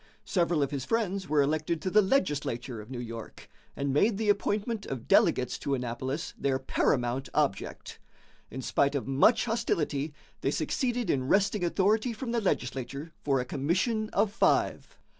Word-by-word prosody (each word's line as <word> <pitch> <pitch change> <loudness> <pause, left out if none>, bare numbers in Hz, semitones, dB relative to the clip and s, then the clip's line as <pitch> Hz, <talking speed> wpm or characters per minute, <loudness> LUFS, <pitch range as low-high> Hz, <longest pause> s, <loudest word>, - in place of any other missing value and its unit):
Several 170 -5 +1
of 140 - -2
his 140 -3 -3
friends 200 - -1
were 150 -1 +4
elected 155 +3 0
to 185 - -1
the 210 - +6
legislature 145 - -1
of 105 - -13
New 130 - -6
York, 115 -2 -8 0.3
and 140 -1 -1
made 200 +8 +3
the 215 -1 0
appointment 205 +2 0
of 130 -4 -5
delegates - - +3
to 140 - -1
Annapolis 130 +4 -4
their 135 -1 +1
paramount 130 0 0
object. 145 -10 -1 0.5
In 130 +2 -6
spite 140 +3 +1
of 140 - -1
much 220 - +4
hostility, 150 - -1 0.2
they - - 0
succeeded 245 -3 0
in 130 -1 -1
wresting 195 +3 +2
authority 210 +7 +2
from 230 +2 -5
the 235 -1 +1
legislature 135 - -2
for 135 -2 +2
a 125 - -2
commission 190 - 0
of 205 0 +1
five. - - +1
150 Hz, 160 wpm, -29 LUFS, 135-205 Hz, 0.5 s, the